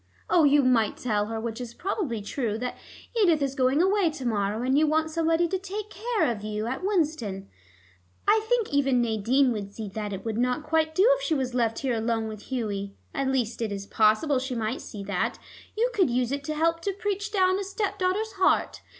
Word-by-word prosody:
Oh, 335 -3 +5
you 285 0 +5
might 240 -4 +2
tell 210 -4 0
her, 225 0 -3
which 225 +1 -4
is 240 -1 -7
probably 335 - -2
true, 220 -1 -2
that 250 +2 -4 0.4
Edith 360 -9 +4
is 275 -2 -1
going 270 +4 +2
away 385 -2 +3
to 295 -4 -7
morrow, 210 0 0
and 260 +1 +2
you 305 +2 +4
want 315 +1 +1
somebody 330 +1 +2
to 380 +2 -2
take 410 +2 -6
care 445 -8 0
of 215 -3 -5
you 215 0 -3
at 260 +8 -3
Winston. 305 - -1 0.8
I 430 +1 +4
think 485 -9 +1
even 270 -3 +3
Nadine 240 +4 +2
would 205 -3 -4
see 220 -2 -5
that 210 +1 -4
it 195 +1 -6
would 225 0 -2
not 250 +4 0
quite 315 0 +1
do 380 - +5
if - - -10
she 330 -10 0
was 260 -3 -2
left 230 -2 +1
here 265 -2 -1
alone 225 0 -1
with 215 -1 -8
Hughie. 200 -5 -3 0.2
At 275 -1 -1
least 245 -4 -1
it 220 -2 -1
is 200 -1 -4
possible 220 +8 +3
she 260 0 -4
might 225 +2 -2
see 205 -2 -8
that: 195 -2 -1 0.4
you 480 +3 +2
could 380 - +3
use 245 0 0
it 280 0 -2
to 310 0 -3
help 330 +2 +1
to 395 +3 -1
preach 405 +1 -3
down 375 -2 +3
a - - -2
stepdaugher's 390 +1 -1
heart. 375 - +2
265 Hz, 215 wpm, -26 LUFS, 225-340 Hz, 0.8 s, Oh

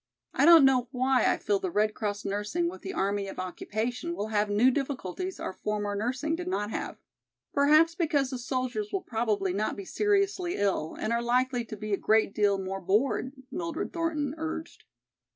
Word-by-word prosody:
I 275 - +3
don't 330 -4 +9
know 255 -2 +3
why 260 0 +2
I - - 0
feel 405 -1 0
the 380 -1 -2
Red 215 -7 +1
Cross 205 -1 -3
nursing 205 - -1
with 345 - -6
the 380 - -5
army 200 - -1
of - - -8
occupation 225 - -3
will 215 -6 -3
have 210 -1 +1
new 220 +6 +4
difficulties 280 - -3
our - - -4
former 205 0 -2
nursing 255 +9 -1
did 355 +1 -6
not 210 - -2
have. - - -4 0.6
Perhaps 305 +4 +5
because 300 -6 0
the 255 - -4
soldiers 255 - -2
will 390 -2 -2
probably 215 -5 -1
not 210 +3 -1
be 200 - -7
seriously 395 - +1
ill 190 -6 -1
and 230 - -1
are 235 - +1
likely 245 +1 +1
to 215 - -8
be 215 0 -4
a - - +3
great 215 -1 +2
deal 205 -2 +2
more 195 0 -4
bored," 215 +7 +1 0.2
Mildred 335 -2 -4
Thornton 310 -4 -1
urged. 320 0 -5
250 Hz, 190 wpm, -28 LUFS, 210-325 Hz, 0.6 s, don't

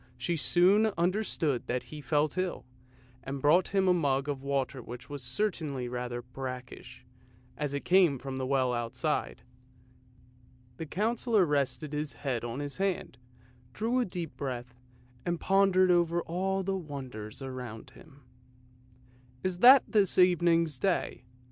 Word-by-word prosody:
She 130 +8 -1
soon 185 +7 +4
understood 170 - 0
that 125 0 -1
he 150 -1 -9
felt 145 +3 0
ill, 185 -1 -2 0.6
and 135 +2 -5
brought 155 +7 +4
him 195 -1 +1
a 180 - +5
mug 140 -5 0
of 140 -2 -3
water 135 -1 -2
which 120 +4 -10
was 145 -2 -5
certainly 140 - -2
rather 120 0 -4
brackish, 125 0 -8 0.5
as 145 -2 -3
it 140 - -4
came 175 -6 +4
from 130 +1 -6
the 130 -1 -2
well 130 -2 +1
outside. 120 +6 -2 1.3
The 160 - -6
Councillor 220 - +1
rested 145 0 -1
his 150 0 -2
head 130 -5 -3
on 120 +4 -4
his 145 -1 -5
hand, 190 -9 -2 0.5
drew 235 +4 0
a 250 - +1
deep 175 -5 -5
breath, 125 -3 -5 0.5
and 175 -1 -2
pondered 190 -1 +4
over 175 -1 +2
all 190 +3 -1
the 195 +1 -1
wonders 130 - -7
around 130 -1 -7
him. 140 0 -17 0.6
" 125 0 -29
Is 185 -1 -2
that 255 +4 +9
this 205 -4 +2
evening's 170 -5 +3
Day?" 185 -9 -1
145 Hz, 145 wpm, -30 LUFS, 130-180 Hz, 1.3 s, that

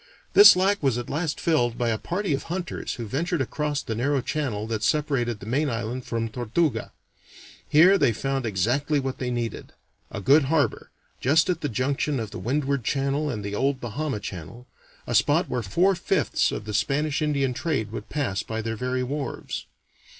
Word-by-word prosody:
This 405 - +10
lack 195 +2 +2
was 135 -5 +1
at 120 - -5
last 155 +1 -2
filled 120 -8 +1
by 120 -2 0
a 110 -2 0
party 185 -2 -2
of 140 - -2
hunters 175 0 -4
who 120 - -5
ventured 165 - -1
across 145 +2 -2
the 110 - -3
narrow 135 +5 +1
channel 125 -7 -2
that 110 -1 -3
separated 130 -5 0
the - - -10
main 140 +7 0
island 120 +2 -3
from 115 -1 -2
Tortuga. 125 +7 -1 0.8
Here 175 +7 +6
they - - +4
found 135 +2 -2
exactly 125 +9 +1
what 135 -1 -4
they 125 - -2
needed 120 -2 -4 0.4
a - - -5
good 140 +8 +5
harbor, 150 +1 0 0.3
just 155 +7 +3
at 170 -2 -3
the 145 - -1
junction 135 +4 -1
of 110 -3 -5
the - - -6
Windward 135 +5 -1
Channel 140 +5 0
with 110 -7 -3
the 100 0 -4
old 135 +4 0
Bahama 130 +1 -3
Channel 100 +5 -8 0.4
a - - -3
spot - - +3
where 125 -1 -2
four 175 - +2
fifths 180 - +1
of 105 - -5
the 105 - -5
Spanish 145 +7 0
Indian 140 -4 +1
trade 125 -8 -2
would 110 -1 -7
pass 125 -10 -1
by 110 0 -5
their 115 0 -3
very 125 +2 -1
wharves. 140 +1 -4
135 Hz, 185 wpm, -25 LUFS, 115-150 Hz, 0.8 s, This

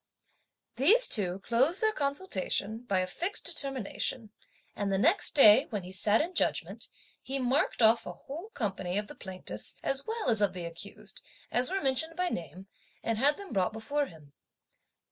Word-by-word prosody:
These 430 - +6
two 185 -4 +2
closed 265 - +2
their 435 0 +2
consultation 280 - -1
by 190 -5 +1
a - - 0
fixed 350 - 0
determination, 255 -4 -2 0.4
and 200 -1 -2
the 195 - +1
next 330 - +2
day, 260 -1 +7
when 210 -5 -4
he 180 - -9
sat 205 +5 +2
in 345 +4 -3
judgment, - - -1 0.3
he 270 - -4
marked 255 -1 0
off 225 +1 +4
a - - -5
whole 330 +10 -9
company 195 -5 -2
of 210 - -1
the - - -11
plaintiffs 185 - -7
as 275 0 0
well 450 -7 -3
as 225 -3 +2
of 205 - +2
the 180 -2 -6
accused, 200 +4 -8 0.3
as 250 +1 +1
were 390 +1 -1
mentioned 280 +4 +1
by 360 0 0
name, 175 - -6 0.4
and 225 -1 -1
had 290 +4 +3
them 400 -7 -9
brought 190 0 +1
before 285 +6 -2
him. 150 -4 -16
230 Hz, 175 wpm, -30 LUFS, 195-290 Hz, 0.4 s, day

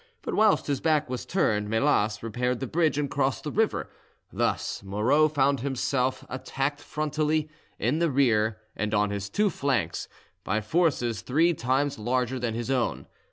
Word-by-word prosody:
But - - -3
whilst 215 -2 +4
his 140 -2 -1
back 155 -4 +1
was 125 - -4
turned 105 - +1
Melas 110 -3 +1
repaired 125 +2 -1
the 135 - -2
bridge 155 +2 +1
and 145 -1 0
crossed 135 -1 -1
the 150 - -4
river; 220 +1 0 0.4
thus - - -1
Moreau 110 +10 +3
found 140 -2 +2
himself 130 0 -1
attacked 135 +2 -3
frontally, 155 +1 -1 0.3
in 125 +9 0
the 170 -1 +2
rear, 110 -6 +2 0.2
and 105 +1 -1
on 105 0 +2
his 100 -1 -4
two 205 - +1
flanks, 130 - -1 0.4
by 105 +3 0
forces 120 - 0
three 160 - +2
times 135 0 0
larger 125 +3 0
than 120 -2 -2
his 120 +2 -3
own. 125 -3 0
130 Hz, 160 wpm, -27 LUFS, 115-150 Hz, 0.4 s, whilst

